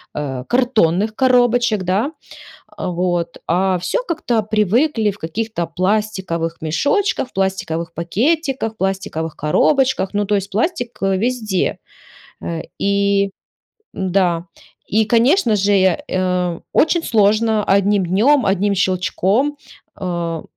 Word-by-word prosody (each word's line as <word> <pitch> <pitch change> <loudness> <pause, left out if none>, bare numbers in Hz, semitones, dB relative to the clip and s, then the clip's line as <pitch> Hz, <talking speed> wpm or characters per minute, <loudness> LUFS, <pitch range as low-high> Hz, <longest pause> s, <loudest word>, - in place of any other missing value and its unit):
э, 135 -4 -4
картонных 215 -5 +1
коробочек, 245 -5 +3
да? 200 - 0 0.7
А, - - -4
вот. 175 -1 -2
А, 185 +1 +1
все 180 - -1
как-то 245 -9 0
привыкли 215 - +1
в 205 - -15
каких-то 175 +2 -3
пластиковых 185 -3 -1
мешочках, 275 - 0
в - - -29
пластиковых 170 -4 -2
пакетиках, 245 - -1
пластиковых 190 -5 -3
коробочках. 255 - +2
Ну 205 0 +1
то 205 - 0
есть 200 0 -1
пластик, 245 - -2
э, 195 -1 +2
везде. 215 -3 -1 0.6
Э, 165 -1 -4 0.2
и 200 0 +2 0.6
да. 180 -3 0 0.4
И, 220 +2 +2
конечно 240 - +3
же, 200 +1 +1
я 190 -3 +3
э, 180 -2 -1
очень 330 +2 +2
сложно 215 0 +2
одним 200 0 +2
днем, 235 +9 +3
одним 200 +1 +1
щелчком, 190 +9 0 0.4
а, 170 -4 -3
200 Hz, 115 wpm, -18 LUFS, 180-230 Hz, 0.7 s, коробочек